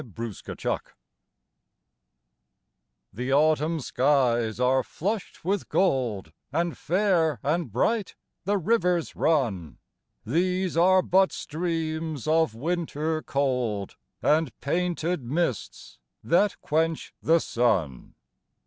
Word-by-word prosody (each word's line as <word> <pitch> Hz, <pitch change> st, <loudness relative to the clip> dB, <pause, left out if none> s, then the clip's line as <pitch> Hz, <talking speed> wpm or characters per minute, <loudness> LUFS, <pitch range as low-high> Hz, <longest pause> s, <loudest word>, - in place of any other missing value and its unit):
AUTUMN 115 Hz, -2 st, -4 dB, 2.3 s
The 125 Hz, +6 st, -3 dB
Autumn 155 Hz, +3 st, +3 dB
skies 125 Hz, -5 st, +1 dB
are 130 Hz, +1 st, +3 dB
flush'd 200 Hz, -, -4 dB
with 195 Hz, +3 st, -1 dB
gold, 120 Hz, -, 0 dB, 0.2 s
And 170 Hz, +3 st, -1 dB
fair 170 Hz, -, +1 dB
and 155 Hz, -3 st, -1 dB
bright 210 Hz, -, 0 dB, 0.3 s
the 200 Hz, +3 st, +1 dB
rivers 180 Hz, -3 st, +1 dB
run; 110 Hz, -, 0 dB, 0.5 s
These 180 Hz, -, 0 dB
are 185 Hz, +2 st, +5 dB
but 190 Hz, +2 st, +3 dB
streams 160 Hz, -3 st, -3 dB
of 160 Hz, -7 st, +2 dB
winter 160 Hz, +2 st, -2 dB
cold, 125 Hz, -9 st, -1 dB, 0.3 s
And 155 Hz, -3 st, +1 dB
painted 175 Hz, +1 st, -1 dB
mists 130 Hz, -, -3 dB, 0.2 s
that 195 Hz, +4 st, +2 dB
quench 160 Hz, +1 st, -1 dB
the 165 Hz, +1 st, +4 dB
sun. 95 Hz, -, -1 dB
155 Hz, 95 wpm, -26 LUFS, 125-175 Hz, 2.3 s, are